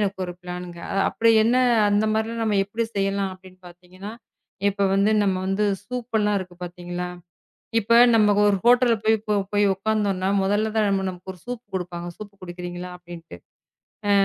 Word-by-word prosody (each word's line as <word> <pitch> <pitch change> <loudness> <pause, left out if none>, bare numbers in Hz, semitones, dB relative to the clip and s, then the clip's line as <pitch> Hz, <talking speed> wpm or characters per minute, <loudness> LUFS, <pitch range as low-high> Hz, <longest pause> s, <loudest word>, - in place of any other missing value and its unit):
எனக்கு 195 -2 -1
ஒரு 175 - -5
பிளான்ங்க 180 -1 -7 0.3
அப்படி 230 0 +2
என்ன 240 +2 +3 0.3
அந்த 205 +1 +2
மாதிரி 220 +1 -1
நம்ம 210 -2 +1
எப்படி 225 +3 -3
செய்யலாம் 195 -1 0
அப்படின்னு 185 0 -17
பாத்தீங்கன்னா, 185 +4 -11 0.6
இப்ப 200 0 0
வந்து 200 +2 +3
நம்ம 195 -2 +1
வந்து 195 +2 0 0.2
சூப்பெல்லாம் 240 -3 -2
எல்லாம் 210 -1 +2
இருக்கு 180 -1 -10
பாத்தீங்களா. 175 0 -6 0.7
இப்ப 230 +3 +2 0.2
நம்ம 210 -2 +4
ஒரு 200 - +3
ஹோட்டல்ல 240 -1 +5
போய் 220 0 +4
இப்ப 210 -1 0
போய் 205 0 +3
உட்காந்தோம்னா 195 -2 -1
முதல்ல 205 +3 +1
தான் 215 - +3
நம் 195 -1 +1
நமக்கு 185 +1 -9
ஒரு 175 - -19
sசூப் 245 -1 -6
கொடுப்பாங்க. 175 -1 -4
சூப் 205 -1 -9
குடிக்கிறீங்களா 175 0 -7
அப்டின்ட்டு. 170 - -11 0.7
அ - - +4
195 Hz, 165 wpm, -23 LUFS, 180-215 Hz, 0.7 s, ஹோட்டல்ல